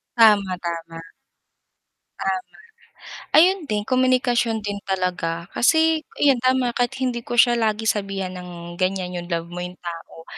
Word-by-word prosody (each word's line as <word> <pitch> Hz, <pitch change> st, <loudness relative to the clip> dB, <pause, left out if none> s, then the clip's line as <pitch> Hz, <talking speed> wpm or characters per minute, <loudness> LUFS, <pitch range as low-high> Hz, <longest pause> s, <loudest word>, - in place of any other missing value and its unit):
Tama, 210 Hz, -5 st, +5 dB
tama. 165 Hz, -1 st, -5 dB, 1.2 s
Tama. 190 Hz, -1 st, 0 dB, 1.0 s
Ayun 355 Hz, 0 st, +4 dB
din, 210 Hz, -1 st, -1 dB
komunikasyon 245 Hz, -3 st, +1 dB
din 205 Hz, -1 st, -3 dB
talaga 180 Hz, -3 st, -2 dB
kasi 320 Hz, +4 st, +3 dB, 0.2 s
'yan 275 Hz, -3 st, +4 dB
tama 255 Hz, -1 st, +2 dB
kahit 245 Hz, +2 st, -1 dB
hindi 250 Hz, -2 st, -1 dB
ko 240 Hz, -, -5 dB
siya 240 Hz, 0 st, +6 dB
lagi 220 Hz, -1 st, 0 dB
sabihan 195 Hz, -3 st, -1 dB
ng 175 Hz, -1 st, -9 dB
ganyan, 185 Hz, -1 st, -1 dB
'yong 175 Hz, -1 st, -6 dB
love 170 Hz, -1 st, -2 dB
mo 180 Hz, -, -5 dB
'yong 180 Hz, 0 st, -6 dB
tao, 165 Hz, -1 st, -9 dB
200 Hz, 140 wpm, -22 LUFS, 180-245 Hz, 1.2 s, siya